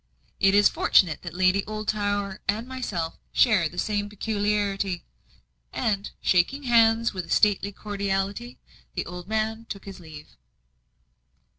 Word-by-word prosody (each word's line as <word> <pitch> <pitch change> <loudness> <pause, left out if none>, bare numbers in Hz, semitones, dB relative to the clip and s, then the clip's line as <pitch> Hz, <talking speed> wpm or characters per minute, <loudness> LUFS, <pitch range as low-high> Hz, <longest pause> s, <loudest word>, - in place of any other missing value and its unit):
"It 195 0 +4
is 205 0 +7
fortunate 165 -6 +3
that 175 -1 -8
Lady 185 +2 +3
Oldtower 205 -2 -2
and 220 +4 -1
myself 205 -11 -4
share 195 -9 +4
the 175 - -13
same 205 0 -1
peculiarity." 205 -3 -1 0.7
And, 205 -1 -1
shaking 190 +11 +2
hands 230 -2 +4
with 185 -2 -4
a - - -18
stately 205 -1 +3
cordiality, 200 +3 -3 0.4
the - - -2
old 180 0 -8
man 220 +1 -1
took 200 - -7
his 195 -1 -9
leave. 155 -3 -12
205 Hz, 130 wpm, -25 LUFS, 190-215 Hz, 0.7 s, is